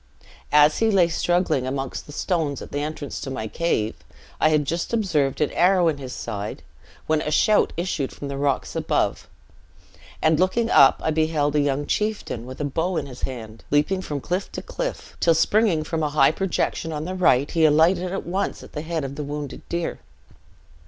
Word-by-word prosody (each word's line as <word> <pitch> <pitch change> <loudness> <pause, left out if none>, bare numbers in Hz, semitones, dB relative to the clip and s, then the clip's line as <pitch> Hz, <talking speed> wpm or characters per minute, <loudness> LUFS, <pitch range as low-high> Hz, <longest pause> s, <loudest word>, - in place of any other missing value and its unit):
As 150 0 +5
he 225 - +3
lay 185 -5 +4
struggling 175 -6 +1
amongst 135 0 -4
the - - -9
stones 155 -3 -1
at - - -10
the 145 - -2
entrance 150 -1 -5
of 135 - -4
my 110 - -4
cave, 110 -6 -1 0.4
I 155 - +4
had 150 -2 +2
just 170 +9 -2
observed 160 - +1
an 150 - +2
arrow 180 -1 +4
in 145 -3 -3
his 130 -2 -7
side, 105 -4 -5 0.4
when 155 -1 +1
a - - -2
shout 210 +7 +3
issued 165 -6 -2
from 140 - -7
the 140 - -4
rocks 140 -1 -1
above, - - -1 0.9
and 155 0 +3
looking 225 +6 +1
up, 135 - +6
I 160 - +2
beheld 155 -2 +1
a - - +4
young 145 0 0
chieftain, 210 - -2
with 130 - -9
a 150 - -1
bow 165 +5 -1
in - - -2
his 130 -2 -10
hand, 115 -4 -6
leaping 150 +6 +2
from 145 -6 -4
cliff 180 +6 -3
to - - -5
cliff, - - -5
till 165 -1 +4
springing 195 -2 +3
from 160 +1 -3
a 150 - 0
high 145 -2 +4
projection 165 -2 -1
on 155 0 -4
the 185 - -4
right, 145 -7 +3
he 165 - +2
alighted 170 +4 +4
at 195 - -4
once 190 +3 -2
at - - -14
the 150 - -4
head 160 -1 -3
of 135 0 -4
the 150 +1 -5
wounded 145 0 -5
deer. 170 0 -2
155 Hz, 200 wpm, -23 LUFS, 140-175 Hz, 0.9 s, up